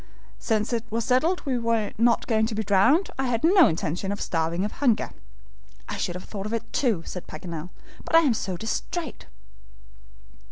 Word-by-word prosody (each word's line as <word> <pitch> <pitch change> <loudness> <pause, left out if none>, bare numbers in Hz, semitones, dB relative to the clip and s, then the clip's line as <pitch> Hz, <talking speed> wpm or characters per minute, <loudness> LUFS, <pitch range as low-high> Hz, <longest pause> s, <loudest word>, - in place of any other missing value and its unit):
"Since 220 +1 0
it 230 -1 0
was 230 +1 -1
settled 315 +9 +2
we 260 -3 0
were 230 -2 0
not 235 +1 +3
going 220 -2 +2
to 220 - -4
be 220 - -1
drowned, 215 - +3
I 265 - +1
had 235 -2 -1
no 355 +1 +7
intention 170 +4 -2
of 205 - -3
starving 165 +3 -1
of 210 - -3
hunger." 250 -6 +1 0.8
"I - - -4
should 175 - -2
have 180 - -6
thought 200 -1 -6
of 220 - -5
it, 230 -1 -1
too," 225 -11 +1
said 180 - -7
Paganel, 165 +1 -7 0.3
"but - - 0
I 330 - +9
am 280 -7 +3
so 190 -4 -3
DISTRAIT." 265 - -4
220 Hz, 190 wpm, -25 LUFS, 190-250 Hz, 0.8 s, I